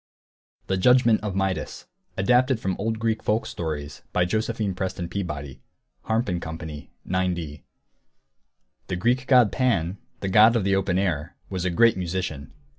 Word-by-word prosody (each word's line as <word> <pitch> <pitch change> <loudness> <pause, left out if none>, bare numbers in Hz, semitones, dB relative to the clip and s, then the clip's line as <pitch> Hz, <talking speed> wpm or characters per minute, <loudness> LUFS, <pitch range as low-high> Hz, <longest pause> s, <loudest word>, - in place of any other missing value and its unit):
THE 95 - 0
JUDGMENT 120 +2 +5
OF 105 -3 -4
MIDAS 95 -1 -2
[Footnote - - -34
1: 95 - -2
Adapted 125 +2 +3
from 95 -3 -2
Old 110 +2 -1
Greek 110 0 -1
Folk 110 +2 0
Stories, 75 -3 -5
by 90 - +2
Josephine 110 +1 -1
Preston 90 -1 -3
Peabody. 75 -8 -5 0.4
(Harrap 115 +2 +1
& 90 -7 -2
Co. 80 - -5
9d.)] 80 0 -4 1.3
The - - -2
Greek 125 +8 0
God 125 -5 +5
Pan, 100 -8 0 0.2
the 95 - -2
god 105 +4 +6
of 115 - +1
the 95 0 +2
open 95 -2 +1
air, 85 -4 -1 0.2
was 95 -1 -2
a - - +2
great 115 +4 +4
musician. 85 -5 -4
95 Hz, 160 wpm, -25 LUFS, 85-110 Hz, 1.3 s, god